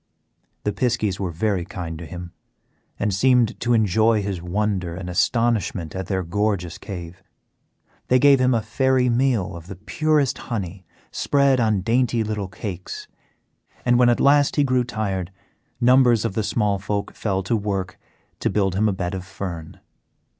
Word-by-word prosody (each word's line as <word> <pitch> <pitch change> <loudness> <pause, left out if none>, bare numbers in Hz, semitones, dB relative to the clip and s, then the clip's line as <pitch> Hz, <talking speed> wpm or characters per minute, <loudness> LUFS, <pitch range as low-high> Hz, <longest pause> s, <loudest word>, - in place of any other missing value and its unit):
The 105 - 0
piskies 110 -3 0
were 95 -2 -2
very 95 +2 -1
kind 85 -3 -6
to 85 - -8
him, 90 -1 -8 0.7
and 105 -1 0
seemed 125 +2 +3
to 120 0 +2
enjoy 110 +1 +3
his 95 -3 -3
wonder 95 -1 -1
and 90 0 -6
astonishment 105 -5 0
at 95 -1 -4
their 95 -2 -1
gorgeous 95 -1 -1
cave. 90 -3 -8 0.9
They 125 - +4
gave 140 0 +6
him 125 -1 +3
a 115 - 0
fairy 130 +2 +2
meal 120 -7 +1
of 85 0 -10
the 95 - -7
purest 140 - 0
honey 95 -5 -4 0.2
spread 140 -2 +2
on 110 -4 +2
dainty 115 +2 +1
little 105 -2 -3
cakes, 90 -1 -7 0.8
and 120 0 +4
when 125 -1 +6
at 120 - +2
last 145 0 +4
he 145 - +3
grew 130 -2 +2
tired 100 -6 -3 0.5
numbers 125 -2 +4
of - - -1
the 110 - 0
small 105 -2 0
folk 100 0 -3
fell 95 -3 -2
to 90 - 0
work 100 -4 -3 0.4
to - - 0
build 95 -3 +1
him 105 +3 +2
a - - 0
bed 90 -1 -3
of 95 -1 -4
fern. 90 -4 -7
105 Hz, 165 wpm, -22 LUFS, 95-120 Hz, 0.9 s, gave